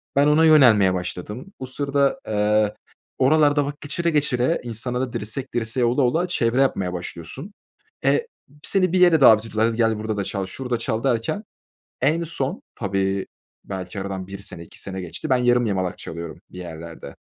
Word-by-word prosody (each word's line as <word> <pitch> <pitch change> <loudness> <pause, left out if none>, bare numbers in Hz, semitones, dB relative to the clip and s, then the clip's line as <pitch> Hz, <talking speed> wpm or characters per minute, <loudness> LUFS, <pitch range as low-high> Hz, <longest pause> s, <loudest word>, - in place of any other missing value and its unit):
Ben 140 +1 +5
ona 155 +2 +5
yönelmeye 120 -12 +6
başladım. 95 - -5
O 130 - -4
sırada, 140 +1 0
eee, 105 0 +2 0.4
oralarda 145 +1 +4
vakit 145 +1 -6
geçire 170 +4 -1
geçire 145 -1 +1
insanlarla 125 +2 -3
dirsek 120 +4 -5
dirseğe 120 +1 0
ola 120 +4 +2
ola 165 +9 +2
çevre 125 -6 +1
yapmaya 95 -9 +1
başlıyorsun. 90 - -7 0.5
Eee, 470 - +2 0.4
seni 185 -2 +1
bir 185 - +3
yere 175 -3 +6
davet 110 -5 +7
ediyolar. 110 0 0
Hadi 115 -1 -2
gel 115 -2 +2
burada 110 0 -3
da 100 - 0
çal 95 0 -3
şurada 125 +5 -3
çal 115 -1 -2
derken 135 - 0 0.6
en 155 +6 +2
son 140 -4 -3
tabii 95 -2 -1 0.4
belki 95 0 -6
aradan 95 -1 -4
1 100 +1 -8
sene 90 -3 -8
2 - - -12
sene 95 -1 -4
geçti. 90 +6 -6
Ben 130 - +5
yarım 120 -1 +3
yamalak 95 -3 -1
çalıyorum 85 0 -7
bir - - -11
yerlerde 85 -4 -9
115 Hz, 170 wpm, -23 LUFS, 100-140 Hz, 0.6 s, davet